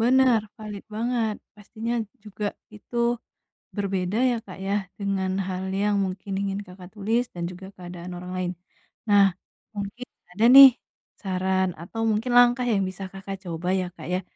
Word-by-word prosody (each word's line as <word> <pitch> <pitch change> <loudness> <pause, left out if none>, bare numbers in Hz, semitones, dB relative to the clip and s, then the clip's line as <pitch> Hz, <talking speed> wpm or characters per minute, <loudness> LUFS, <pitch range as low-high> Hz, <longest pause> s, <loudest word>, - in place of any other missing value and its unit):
Benar, 250 0 +5 0.2
valid 210 -2 -7
banget. 230 -1 0 0.2
Pastinya 220 +3 -5 0.3
juga 210 0 -4 0.3
itu 210 +3 -10 0.8
berbeda, 195 -1 -1
ya 250 -2 +3
Kak, 185 - -10
ya, 195 +1 -1 0.2
dengan 195 -1 0 0.2
hal 185 0 -3
yang 205 +1 +1
mungkin 190 +1 -5
ingin 200 0 -2
Kakak 180 0 -13
tulis, 225 +4 0
dan 175 -1 -5
juga 185 +1 -10
keadaan 180 -1 -8
orang 180 +1 -7
lain. 180 -1 -1 0.6
Nah, 205 -1 +7 0.5
mungkin 205 +4 -5 0.3
ada 215 +5 +2
nih, 275 0 +13 0.5
saran 190 -1 0
atau 225 +6 -5
mungkin 225 +4 -1
langkah 245 +1 +6
yang 195 - +2
bisa 185 +1 -8
Kakak 195 0 -6
coba, 170 +2 -3
ya 180 - -3
Kak, - - -9
ya. 185 - +1
200 Hz, 155 wpm, -25 LUFS, 185-220 Hz, 0.8 s, nih